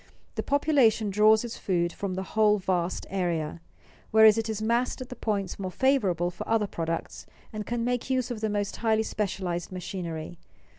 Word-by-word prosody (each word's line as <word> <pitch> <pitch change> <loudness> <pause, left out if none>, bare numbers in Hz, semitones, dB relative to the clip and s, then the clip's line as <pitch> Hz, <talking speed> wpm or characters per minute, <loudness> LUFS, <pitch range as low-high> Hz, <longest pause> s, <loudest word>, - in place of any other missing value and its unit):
The - - -2
population 270 -8 +3
draws 215 +2 +5
its 230 - -7
food 175 -3 0
from 195 -2 -4
the 190 - -3
whole 215 -1 +4
vast 185 -2 -1
area; 170 -4 -2 0.5
whereas 220 -1 +7
it 225 0 -2
is 215 -1 -2
massed 235 +5 0
at 255 -1 -7
the 250 - -7
points 200 -6 -2
more 190 -1 -3
favorable 185 - +1
for 175 - -8
other 225 -2 +3
products 165 -4 -4 0.3
and 215 -1 -5
can 240 -1 -1
make 245 +1 -1
use 255 -1 0
of 225 -3 -5
the 220 - 0
most 205 -1 -2
highly 220 -1 +2
specialized 190 -5 -3
machinery. 175 -3 -5
210 Hz, 180 wpm, -27 LUFS, 180-225 Hz, 0.5 s, whereas